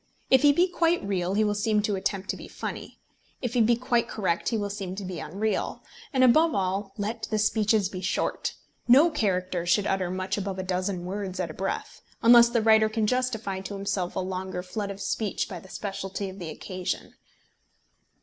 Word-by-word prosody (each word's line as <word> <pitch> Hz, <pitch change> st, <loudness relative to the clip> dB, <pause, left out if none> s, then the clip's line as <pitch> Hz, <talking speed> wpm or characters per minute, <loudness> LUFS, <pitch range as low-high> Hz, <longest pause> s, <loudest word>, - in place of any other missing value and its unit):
If 265 Hz, -1 st, +7 dB
he 290 Hz, -, +7 dB
be 345 Hz, +6 st, +3 dB
quite 345 Hz, -1 st, +1 dB
real 185 Hz, -1 st, 0 dB
he 215 Hz, -, +3 dB
will 210 Hz, -1 st, +1 dB
seem 210 Hz, 0 st, +1 dB
to 205 Hz, -1 st, 0 dB
attempt 190 Hz, 0 st, -2 dB
to -, -, -6 dB
be -, -, -10 dB
funny. -, -, -6 dB, 0.4 s
If 245 Hz, -3 st, -3 dB
he 245 Hz, -, +3 dB
be 235 Hz, +2 st, +4 dB
quite 240 Hz, -1 st, +1 dB
correct 185 Hz, -5 st, -1 dB
he 230 Hz, -, 0 dB
will 205 Hz, -1 st, -2 dB
seem 190 Hz, -2 st, -5 dB
to 200 Hz, 0 st, -5 dB
be 180 Hz, -2 st, -5 dB
unreal. 205 Hz, +7 st, -2 dB, 0.3 s
And 260 Hz, -3 st, +3 dB
above 310 Hz, +7 st, +5 dB
all, 195 Hz, +1 st, -1 dB
let 220 Hz, +2 st, -3 dB
the 215 Hz, -, 0 dB
speeches 215 Hz, -1 st, +2 dB
be 185 Hz, -1 st, -7 dB
short. 185 Hz, -, -1 dB, 0.3 s
No 285 Hz, +8 st, +7 dB
character 185 Hz, -, 0 dB
should 200 Hz, +3 st, +3 dB
utter 190 Hz, -3 st, 0 dB
much 185 Hz, +2 st, -2 dB
above 195 Hz, -1 st, -4 dB
a 185 Hz, -, -3 dB
dozen 185 Hz, 0 st, -2 dB
words 190 Hz, 0 st, -4 dB
at 170 Hz, -3 st, -2 dB
a -, -, -10 dB
breath, 195 Hz, +3 st, -4 dB, 0.2 s
unless 235 Hz, 0 st, +8 dB
the 235 Hz, -2 st, +1 dB
writer 220 Hz, -1 st, +5 dB
can 220 Hz, 0 st, 0 dB
justify 230 Hz, -5 st, -1 dB
to 195 Hz, +1 st, -6 dB
himself 195 Hz, -2 st, -2 dB
a -, -, 0 dB
longer 185 Hz, -1 st, -4 dB
flood 200 Hz, +2 st, -4 dB
of 200 Hz, 0 st, -6 dB
speech 200 Hz, +1 st, -1 dB
by 185 Hz, -5 st, -7 dB
the 190 Hz, -, -15 dB
speciality 195 Hz, -1 st, -4 dB
of 190 Hz, -, -12 dB
the 170 Hz, -3 st, -5 dB
occasion. 185 Hz, +2 st, -5 dB
200 Hz, 205 wpm, -27 LUFS, 185-225 Hz, 0.4 s, unless